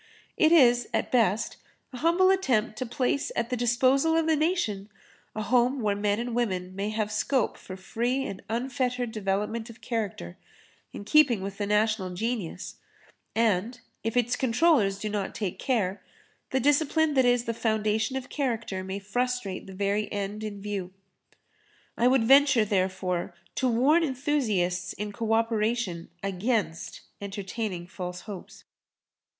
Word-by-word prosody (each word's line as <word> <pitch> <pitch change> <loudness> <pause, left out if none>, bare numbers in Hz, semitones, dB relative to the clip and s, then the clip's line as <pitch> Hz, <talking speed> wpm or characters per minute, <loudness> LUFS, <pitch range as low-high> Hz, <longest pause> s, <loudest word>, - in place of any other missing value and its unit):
It 315 -1 +4
is, 245 -7 +5
at - - -1
best, 225 -4 +2 0.4
a - - -6
humble 340 +6 +4
attempt 245 - +1
to 255 - -3
place 255 +4 -1
at 235 +1 -1
the - - +1
disposal 260 +6 +3
of 325 - +2
the 320 0 +3
nation 295 - 0 0.5
a 215 - -2
home 250 +4 +2
where 210 -3 +1
men 205 +1 0
and 240 0 -3
women 185 -6 -1
may 200 +2 -2
have 215 -1 -2
scope 245 +3 0
for 185 - -9
free 240 +7 -1
and 195 -7 -6
unfettered 250 0 -1
development 210 +2 -2
of 230 +1 -12
character, 215 - -4 0.5
in 205 - -8
keeping 255 -7 +4
with 195 +1 -6
the 205 - -1
national 210 -3 +1
genius, 215 -4 -3 0.6
and, 225 +1 +1 0.2
if 225 +2 -1
its 245 0 +2
controllers 245 -5 +3
do 215 - -4
not 205 -2 -3
take 200 -5 -3
care, 210 -8 0 0.5
the 265 - +1
discipline 295 +3 +2
that 265 -2 +4
is 245 -1 +3
the 230 - -2
foundation 220 +1 0
of 260 -1 -4
character 230 -9 -2
may 190 +1 -4
frustrate 210 -1 -2
the - - -9
very 200 +2 -1
end 205 +1 -3
in 205 -2 -5
view. 195 -3 -4 1.0
I 240 - +3
would 255 -2 +4
venture, 270 -2 +6
therefore, 185 -3 -1 0.2
to 260 - +1
warn 275 +9 +4
enthusiasts 235 - 0
in 210 +1 -5
co 225 0 -1
operation 225 -5 0
against 195 -3 -2 0.2
entertaining 200 -2 -4
false 180 0 -6
hopes. 200 -4 -10
225 Hz, 150 wpm, -27 LUFS, 200-250 Hz, 1.0 s, venture